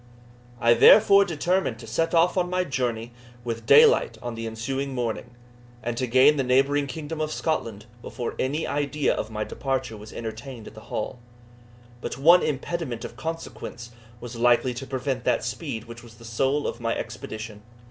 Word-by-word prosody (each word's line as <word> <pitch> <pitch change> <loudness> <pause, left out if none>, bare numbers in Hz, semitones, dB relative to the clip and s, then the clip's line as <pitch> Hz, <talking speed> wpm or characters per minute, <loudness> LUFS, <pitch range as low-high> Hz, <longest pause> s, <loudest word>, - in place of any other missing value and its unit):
I 115 0 +5
therefore 200 - +7
determined 175 - 0
to 115 - -11
set 165 +9 -1
off 170 +2 +4
on 180 -1 +1
my 180 0 +1
journey 120 -6 -2 0.3
with 115 -1 -5
daylight 465 +1 +6
on 120 -1 -5
the 115 0 -5
ensuing 135 +5 -3
morning, 120 0 -3 0.5
and 120 +1 -2
to 130 - -1
gain 130 +5 +5
the 135 - +1
neighbouring 135 +3 +2
kingdom 155 +3 -5
of 155 0 -1
Scotland 115 -11 -2 0.2
before 120 -1 -5
any 145 +5 -1
idea 145 0 0
of - - -4
my 110 -1 -3
departure 130 -1 -3
was 105 0 -11
entertained 115 +1 -7
at - - -11
the 110 0 -13
Hall. 115 +3 -4 0.8
But - - -5
one 170 +6 +6
impediment 145 -3 -3
of - - -8
consequence 130 -6 -6 0.3
was 120 0 -8
likely 120 +1 +3
to 130 +2 -7
prevent 130 -1 -2
that - - +1
speed 120 -1 -4
which 115 0 -11
was 115 -1 -15
the 115 0 -14
soul 135 +6 0
of - - -3
my 115 0 0
expedition. 110 -2 -7
125 Hz, 175 wpm, -25 LUFS, 115-150 Hz, 0.8 s, therefore